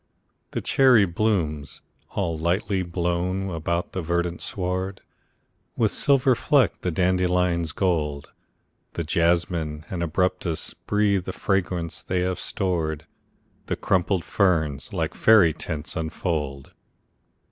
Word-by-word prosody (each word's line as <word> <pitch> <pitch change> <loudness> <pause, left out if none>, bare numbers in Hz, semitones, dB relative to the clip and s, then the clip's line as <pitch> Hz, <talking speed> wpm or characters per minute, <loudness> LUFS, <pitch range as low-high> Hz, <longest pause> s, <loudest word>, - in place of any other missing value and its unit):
The - - -3
cherry 130 -6 +5
blooms, 85 -6 -1 0.3
all 85 -5 0
lightly 90 +4 0
blown 90 +2 -1
about 85 +2 -2
the 95 - -2
verdant 85 +1 -1
sward, 95 0 -3 0.8
With 110 -3 +2
silver 135 -2 +3
fleck 125 - +2
the 90 - -1
dandelion's 90 -1 +1
gold; 75 -7 -1 0.6
The 85 - -2
jasmine 85 -2 0
and 90 -3 -3
arbutus 85 0 -1
breathe 100 -3 0
the - - -4
fragrance 90 -3 -1
they 90 -1 -1
have 90 0 -1
stored; 80 -5 -2 0.6
The - - -1
crumpled 95 -1 0
ferns, 80 -8 +1
like - - -2
faery 105 -8 +5
tents, 80 0 -5
unfold. 80 -4 -3
90 Hz, 115 wpm, -24 LUFS, 80-95 Hz, 0.8 s, cherry